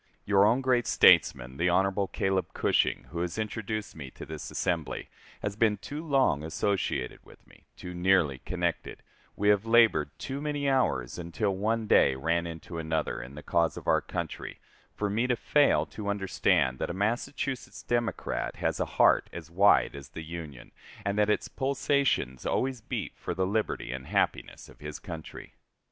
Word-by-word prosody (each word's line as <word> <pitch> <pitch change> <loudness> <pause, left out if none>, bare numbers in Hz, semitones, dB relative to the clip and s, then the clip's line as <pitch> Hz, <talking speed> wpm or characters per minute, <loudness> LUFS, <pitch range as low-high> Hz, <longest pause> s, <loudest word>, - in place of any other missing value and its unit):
Your 100 -1 +5
own 120 +5 +3
great 125 -2 +2
statesman 65 +1 +4
[the 85 +3 +2
Hon. 95 +2 +2
Caleb 95 -2 -1
Cushing], - - +1
who 85 - -4
has 85 +2 -3
introduced 110 -1 -4
me 70 -4 -8
to - - -10
this 80 -1 -7
assembly, 80 -8 -2 0.3
has 105 -1 -2
been 110 -1 +2
too 145 +9 -7
long 135 - +2
associated 80 -5 -2
with - - -18
me, - - -21
too 90 - -7
nearly 90 -7 +2
connected, 65 - -3 0.3
we 105 +1 +2
have 105 +1 +3
labored 115 -11 +5
too 140 +1 -5
many 145 -1 -2
hours, 90 - +1
until 85 +5 -1
one 110 +3 0
day 70 -9 +4
ran 85 +5 0
into 85 +1 -7
another, 80 -1 -2
in 60 +3 -10
the 75 - -9
cause 85 -1 +1
of - - -9
our - - +4
country, - - -5 0.4
for 105 - -1
me 110 +5 0
to 125 - +2
fail 145 +4 +3
to 105 -2 -8
understand 95 -10 +1
that - - -2
a 85 - -4
Massachusetts 120 +6 -2
Democrat 120 -1 -2
has - - -1
a - - +1
heart - - +5
as 85 - -9
wide 100 -1 +4
as 70 -1 -9
the 80 - -8
Union, 80 -5 -8 0.3
and 100 0 0
that 105 0 +2
its 105 - +1
pulsations 135 - 0
always 130 -2 -1
beat - - -4
for - - -5
the 95 - +1
liberty 105 - -1
and 65 0 -6
happiness - - -1
of - - -17
his 75 0 -6
country. 80 -3 -9
95 Hz, 175 wpm, -28 LUFS, 80-115 Hz, 0.4 s, Your